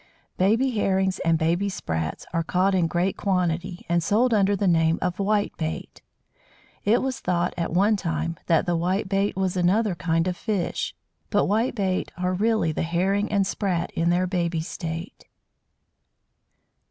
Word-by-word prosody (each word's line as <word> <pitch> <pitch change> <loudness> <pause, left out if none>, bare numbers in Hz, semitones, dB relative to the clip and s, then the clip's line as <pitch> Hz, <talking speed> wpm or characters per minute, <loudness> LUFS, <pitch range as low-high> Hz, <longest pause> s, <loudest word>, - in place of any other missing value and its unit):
Baby 225 +8 +2
Herrings 190 -3 +1
and 165 -1 +2
baby 170 +5 +1
Sprats 80 - -3
are 165 - +1
caught 185 +4 +1
in 180 -3 +2
great 175 +3 0
quantity, 180 -1 -1
and 170 0 +2
sold 225 +8 +2
under 200 -1 +3
the 200 0 0
name 165 -1 +3
of 180 0 -2
"Whitebait." 200 -6 -2 0.8
It 225 +5 +3
was 260 -3 -2
thought, 175 -2 0
at 170 - -2
one 200 +5 +3
time, 165 -2 -2
that 165 -2 +3
the 175 - +1
Whitebait 195 +3 0
was 190 -1 -1
another 190 +4 +2
kind 165 -1 0
of 180 - -1
fish; 195 - -2 0.3
but - - +2
Whitebait 205 -3 0
are 180 0 0
really 215 -3 +1
the - - -3
Herring 190 +5 0
and 200 -2 +2
Sprat 190 -3 -1
in 165 +1 0
their 180 +1 +2
baby 175 -3 -1
state. 165 +2 -6
185 Hz, 155 wpm, -25 LUFS, 170-200 Hz, 0.8 s, under